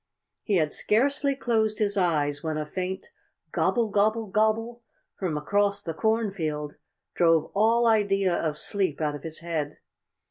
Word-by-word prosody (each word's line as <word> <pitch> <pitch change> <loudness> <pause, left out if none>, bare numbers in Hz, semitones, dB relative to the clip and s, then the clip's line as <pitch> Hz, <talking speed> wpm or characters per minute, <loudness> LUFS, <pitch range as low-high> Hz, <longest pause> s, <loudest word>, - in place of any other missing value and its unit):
He 205 - 0
had 155 -4 +2
scarcely 275 +5 +1
closed 220 -5 0
his 205 -1 0
eyes 150 -6 +1
when 160 -1 -2
a 155 - -2
faint 185 +4 -5 0.4
"Gobble, 235 -2 +1
gobble, 215 +2 +2
gobble" 220 +3 0 0.3
from 175 -6 -3
across 200 +6 0
the 165 - -4
cornfield 170 -8 -1 0.4
drove 165 -2 +3
all 225 +3 +3
idea 200 -4 +3
of 155 -3 -1
sleep 190 -7 -1
out 150 -2 0
of 145 - -7
his 160 0 -6
head. 155 -3 -3
195 Hz, 145 wpm, -26 LUFS, 160-220 Hz, 0.4 s, drove